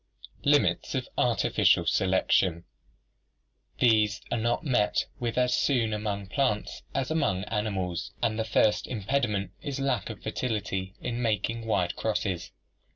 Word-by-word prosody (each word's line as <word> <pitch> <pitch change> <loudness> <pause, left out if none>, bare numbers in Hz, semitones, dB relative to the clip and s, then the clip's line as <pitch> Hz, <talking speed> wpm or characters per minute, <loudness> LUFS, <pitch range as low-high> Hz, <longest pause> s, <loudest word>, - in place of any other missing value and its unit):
Limits - - +2
of - - -2
Artificial - - +3
Selection 95 -2 +2 1.1
These 110 -3 +3
are - - +1
not 120 +8 0
met 105 -7 +2
with 120 -1 -2
as 125 0 +3
soon 115 -6 +1
among 105 -2 -2
plants 105 0 -1
as 135 +2 -1
among 100 - +1
animals, 100 -5 -2
and 115 -2 0
the - - +2
first 110 -1 +2
impediment 105 -4 -1
is 140 -1 -4
lack 135 -2 0
of 110 - -8
fertility 105 -5 -3
in 120 0 -3
making 115 0 -1
wide 90 -4 +1
crosses. 100 -5 -1
110 Hz, 130 wpm, -28 LUFS, 100-120 Hz, 1.1 s, Artificial